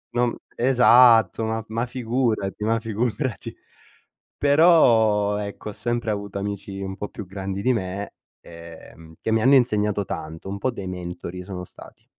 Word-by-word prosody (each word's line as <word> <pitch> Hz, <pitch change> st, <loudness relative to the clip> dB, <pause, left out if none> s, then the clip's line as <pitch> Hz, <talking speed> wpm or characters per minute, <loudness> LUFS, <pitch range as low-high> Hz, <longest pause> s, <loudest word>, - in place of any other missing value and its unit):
No, 120 Hz, 0 st, +3 dB
m 120 Hz, -, -3 dB, 0.2 s
esatto, 120 Hz, -2 st, +5 dB
ma 110 Hz, 0 st, -2 dB
ma 115 Hz, +2 st, -2 dB
figurati, 115 Hz, -5 st, -2 dB
ma 115 Hz, +1 st, +1 dB
figurati. 115 Hz, +2 st, -3 dB, 0.8 s
Però, 115 Hz, -10 st, +4 dB
ecco, 105 Hz, +1 st, -6 dB
ho -, -, -7 dB
sempre 120 Hz, 0 st, -2 dB
avuto 100 Hz, -1 st, -4 dB
amici 100 Hz, -1 st, -5 dB
un 95 Hz, 0 st, -5 dB
po' 105 Hz, -, -5 dB
più 105 Hz, -, -8 dB
grandi 95 Hz, +1 st, -5 dB
di 130 Hz, +4 st, +2 dB
me, 100 Hz, -2 st, -4 dB, 0.3 s
ehm, 85 Hz, -1 st, -13 dB
che 110 Hz, -, -2 dB
mi 110 Hz, 0 st, +2 dB
hanno 135 Hz, +4 st, +5 dB
insegnato 105 Hz, -5 st, +2 dB
tanto, 80 Hz, +2 st, -7 dB
un 100 Hz, -, -4 dB
po' 130 Hz, -, 0 dB
dei 100 Hz, -6 st, -7 dB
mentori 90 Hz, 0 st, -6 dB
sono 90 Hz, -1 st, -7 dB
stati. -, -, -15 dB
105 Hz, 160 wpm, -23 LUFS, 95-120 Hz, 0.8 s, esatto